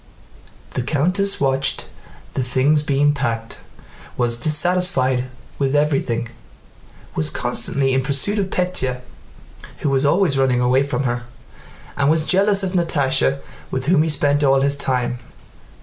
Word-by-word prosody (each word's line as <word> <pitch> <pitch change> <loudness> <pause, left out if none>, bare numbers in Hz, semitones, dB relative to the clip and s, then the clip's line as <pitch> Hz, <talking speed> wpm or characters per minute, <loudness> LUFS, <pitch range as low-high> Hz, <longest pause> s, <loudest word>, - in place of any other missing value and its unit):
The - - -2
countess 180 +9 0
watched 135 0 0 0.5
the - - -1
things 130 +4 +2
being 145 0 +2
packed, 115 -5 -3 0.6
was 120 -1 0
dissatisfied 155 -5 +2 0.3
with 135 0 0
everything, 135 -6 0 0.8
was 80 - -1
constantly 135 -1 0
in 130 - +2
pursuit 140 +10 0
of 195 -1 -1
Pétya 130 -10 -2 0.8
who 145 - 0
was 135 0 +1
always 145 -1 +2
running 130 -2 +2
away 125 +2 +3
from 140 0 -2
her, 120 -1 -2 0.7
and 140 0 +1
was 160 0 +2
jealous 195 +2 +3
of 190 - -1
Natásha 140 -6 +1 0.3
with 130 0 -3
whom 165 0 +3
he 160 - +1
spent 145 -1 +1
all 135 -1 +4
his 140 +1 +2
time. 125 -3 -1
140 Hz, 135 wpm, -20 LUFS, 130-155 Hz, 0.8 s, all